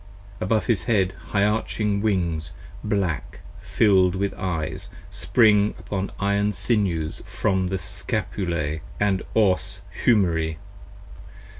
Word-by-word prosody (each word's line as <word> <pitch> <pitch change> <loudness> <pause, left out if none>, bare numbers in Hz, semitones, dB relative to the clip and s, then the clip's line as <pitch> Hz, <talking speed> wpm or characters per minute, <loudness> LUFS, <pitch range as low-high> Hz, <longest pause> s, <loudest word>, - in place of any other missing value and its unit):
Above 110 +3 +1
his 100 -8 +1
Head 95 -4 +2 0.2
high 100 -1 +1
arching 105 -1 0
Wings, 85 -7 -1 0.3
black, 100 -7 -2 0.2
fill'd 95 -4 +3
with 100 +1 -1
Eyes, 90 +2 -3 0.2
Spring 105 0 +3
upon 100 -1 -4
iron 100 +1 +1
sinews 90 -11 0
from 95 -3 0
the 95 +1 -1
Scapulas 80 -2 -3 0.2
& 100 -2 -1
Os 100 -4 +2 0.2
Humeri. 80 -8 +2
95 Hz, 105 wpm, -24 LUFS, 90-105 Hz, 0.3 s, fill'd